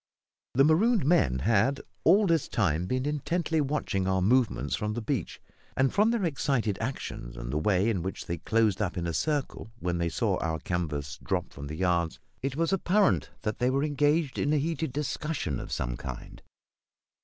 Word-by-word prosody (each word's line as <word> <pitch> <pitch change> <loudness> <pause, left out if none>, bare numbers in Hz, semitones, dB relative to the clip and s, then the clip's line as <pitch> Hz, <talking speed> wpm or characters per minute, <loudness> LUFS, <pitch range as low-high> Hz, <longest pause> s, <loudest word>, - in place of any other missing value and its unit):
The 135 - +6
marooned 190 - +4
men 105 - +3
had 115 +5 +3 0.2
all 205 +2 +6
this 165 -5 +2
time 90 -5 0
been 130 +5 -1
intently 155 +2 0
watching 135 -10 -1
our 95 0 +2
movements 105 - +2
from 105 -1 -2
the - - -1
beach; 115 - -3 0.4
and, 130 0 +2
from 210 +3 +4
their 230 -5 +1
excited 135 - 0
actions 85 - -5
and - - -5
the 75 - +1
way 95 +4 +2
in 105 -6 +1
which 95 +3 -5
they 85 -1 -3
closed 110 +1 +1
up 95 -3 -1
in 85 - -2
a 85 - -2
circle 145 - -2
when 90 -5 -2
they 85 0 0
saw 80 - 0
our 80 -1 -1
canvas 75 -3 -3
drop 90 -2 -2
from 70 0 -7
the 75 - -5
yards, 85 -2 0 0.2
it 135 0 -2
was 165 +4 +1
apparent 195 +2 +2
that 110 -1 -2
they 125 - +2
were 135 +2 +1
engaged 145 0 +1
in 145 - +1
a - - +3
heated 160 0 -1
discussion 140 - -2
of - - -7
some - - -2
kind. 65 0 -8
115 Hz, 190 wpm, -28 LUFS, -, 0.4 s, The